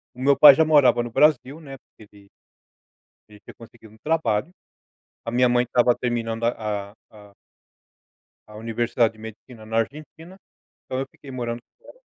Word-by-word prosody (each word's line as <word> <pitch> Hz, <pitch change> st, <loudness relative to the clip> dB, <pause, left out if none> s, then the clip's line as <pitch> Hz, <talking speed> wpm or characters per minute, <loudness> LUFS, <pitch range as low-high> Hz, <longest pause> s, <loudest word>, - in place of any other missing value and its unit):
O -, -, -15 dB
meu 140 Hz, 0 st, +5 dB
pai 145 Hz, 0 st, +10 dB
já 160 Hz, -, +3 dB
morava 145 Hz, -6 st, +4 dB
no 120 Hz, -, -8 dB
Brasil, 150 Hz, +2 st, +1 dB
né, 135 Hz, -4 st, -11 dB
porque 120 Hz, -, -22 dB
ele 100 Hz, -1 st, -19 dB, 1.0 s
ele 105 Hz, -1 st, -17 dB
tinha -, -, -15 dB
conseguido 115 Hz, -2 st, -17 dB
um -, -, -19 dB
trabalho. 155 Hz, -2 st, -1 dB, 0.7 s
A 115 Hz, -, -4 dB
minha 125 Hz, +1 st, +2 dB
mãe 120 Hz, 0 st, +2 dB
estava 120 Hz, 0 st, +2 dB
terminando 115 Hz, -2 st, -3 dB
a 105 Hz, -4 st, -3 dB
a -, -, -26 dB, 0.2 s
a 105 Hz, -2 st, -17 dB, 1.2 s
a 105 Hz, -, -13 dB
universidade 115 Hz, +1 st, -1 dB
de 110 Hz, -, -19 dB
Medicina 110 Hz, +1 st, -12 dB
na 110 Hz, +1 st, -3 dB
Argentina, 155 Hz, -, -7 dB, 0.5 s
então, 130 Hz, -, -5 dB
eu -, -, -4 dB
fiquei 140 Hz, -, -16 dB
morando 120 Hz, -2 st, -5 dB, 0.2 s
fora. -, -, -17 dB
120 Hz, 170 wpm, -22 LUFS, 110-135 Hz, 1.2 s, pai